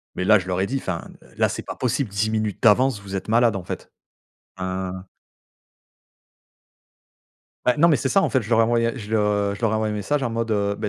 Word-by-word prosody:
Mais 90 - -2
là, 105 +3 +6
je 95 - -7
leur 90 0 -1
ai 95 - +1
dit: 135 - -2
«Enfin, 90 -8 -5
l - - -20
là, - - +3
c'est - - -5
pas - - -7
possible, 125 -2 -1
10 105 +2 0
minutes 110 -2 -2
d'avance, 120 0 +4
vous 100 -1 -6
êtes 95 - -6
malades, 115 -1 +3
en 90 - -6
fait», - - -7 0.7
heu 95 0 -3 2.7
Ben, 125 - +3
non 170 - +6
mais 165 - +5
c'est 135 - -1
ça 195 - +4
en - - +2
fait 130 - +1
je 110 - -9
leur 115 - +4
ai - - +6
envoyé 115 0 +2
je 105 - -8
je 110 - -8 0.5
leur 115 - +2
ai - - 0
envoyé 110 -1 -1
un - - -3
message 125 +9 -1
en 120 - -1
mode, 115 0 -2
heu: 100 -1 +1
«Bah 105 - -3
110 Hz, 235 wpm, -23 LUFS, 100-120 Hz, 2.7 s, là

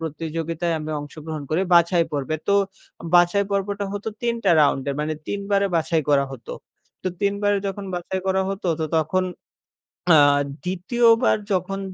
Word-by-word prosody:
প্রতিযোগিতায় 165 +1 -3
আমি 155 0 -5
অংশগ্রহণ 155 +1 -7
করি 160 +4 +1
বাছাই 170 0 +4
পর্বে। 145 +2 -2
তো 200 - +4 0.6
বাছাই 175 +3 +5
পর্বটা 200 +1 -1
হতো 205 +2 -4
৩ 235 -1 +1
টা - - +4
রাউন্ডে। 140 -1 +2
মানে 155 +1 -1
৩ 205 - -3
বারে 200 0 +3
বাছাই 160 0 +1
করা 140 -1 +4
হতো। 120 -3 -8 0.5
তো 185 - 0
৩ 200 0 +2
বারে 205 0 +3
যখন 195 +1 -4
বাছাই 180 +2 -3
করা 190 0 +2
হতো, 195 0 -5
তো - - +1
তখন 160 +4 +1 0.9
আ - - +8 0.5
২য়, 190 +7 +1 0.2
বার - - +4 0.2
যখন 195 +1 -1
175 Hz, 160 wpm, -23 LUFS, 155-200 Hz, 0.9 s, আ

